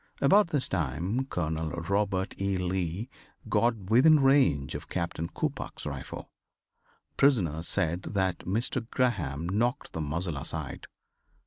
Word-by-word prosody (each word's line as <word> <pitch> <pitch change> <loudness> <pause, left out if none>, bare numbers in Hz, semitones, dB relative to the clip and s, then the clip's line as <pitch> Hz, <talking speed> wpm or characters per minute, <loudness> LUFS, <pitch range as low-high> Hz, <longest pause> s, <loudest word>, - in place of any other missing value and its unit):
About 200 +9 +5
this 145 -6 -1
time 90 - -1
Colonel 80 - -2
Robert 95 +3 -1
E. 100 -1 +1
Lee 90 +3 -2 0.4
got 115 -1 +2
within 150 +7 +7
range 135 - +3
of - - -7
Captain 85 -2 -2
Coppoc's 145 - -4
rifle. - - -6 0.9
Prisoners 90 - +2
said 90 -2 0
that 95 -3 -1
Mr. 115 +4 -1
Graham 85 - 0
knocked 120 +9 -1
the 80 - -3
muzzle 80 +1 -2
aside. 75 0 -5
95 Hz, 120 wpm, -29 LUFS, 80-120 Hz, 0.9 s, within